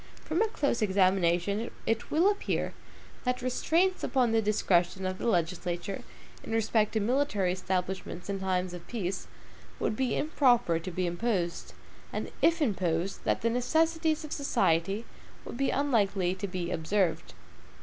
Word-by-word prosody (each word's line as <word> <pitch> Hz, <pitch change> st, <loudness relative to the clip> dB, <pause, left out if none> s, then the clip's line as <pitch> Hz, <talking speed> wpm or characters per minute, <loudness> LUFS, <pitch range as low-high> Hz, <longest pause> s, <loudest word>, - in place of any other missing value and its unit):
From 325 Hz, +5 st, 0 dB
a 450 Hz, -, +4 dB
close 285 Hz, -, -1 dB
examination 190 Hz, +1 st, +2 dB, 0.2 s
it 225 Hz, 0 st, -1 dB
will 345 Hz, +7 st, +4 dB
appear 410 Hz, -, -2 dB, 0.5 s
that 250 Hz, 0 st, -1 dB
restraints 335 Hz, +9 st, +1 dB
upon 250 Hz, -4 st, +2 dB
the 225 Hz, 0 st, +3 dB
discretion 190 Hz, -3 st, +1 dB
of 185 Hz, 0 st, -3 dB
the -, -, -2 dB
legislature 175 Hz, 0 st, -1 dB, 0.4 s
in -, -, -5 dB
respect 220 Hz, -1 st, +2 dB
to 220 Hz, -, +2 dB
military 215 Hz, -5 st, +1 dB
establishments 185 Hz, -1 st, -3 dB
in 200 Hz, -1 st, -2 dB
time 185 Hz, -1 st, 0 dB
of 175 Hz, -1 st, -9 dB
peace, 195 Hz, -5 st, -3 dB, 0.5 s
would -, -, 0 dB
be 255 Hz, -1 st, 0 dB
improper 245 Hz, -, +3 dB
to 165 Hz, -, -6 dB
be 185 Hz, +1 st, -1 dB
imposed, 175 Hz, -1 st, -2 dB, 0.4 s
and -, -, -4 dB
if 335 Hz, -1 st, +4 dB
imposed, 185 Hz, -, -1 dB
from -, -, +2 dB
the 230 Hz, -, +2 dB
necessities 320 Hz, +5 st, +1 dB
of 300 Hz, -, -10 dB
society, 205 Hz, -, +1 dB, 0.4 s
would -, -, -7 dB
be 275 Hz, +1 st, +1 dB
unlikely 205 Hz, -10 st, +1 dB
to 190 Hz, +2 st, -4 dB
be 180 Hz, -2 st, -3 dB
observed. 175 Hz, +1 st, 0 dB
205 Hz, 150 wpm, -29 LUFS, 180-250 Hz, 0.5 s, a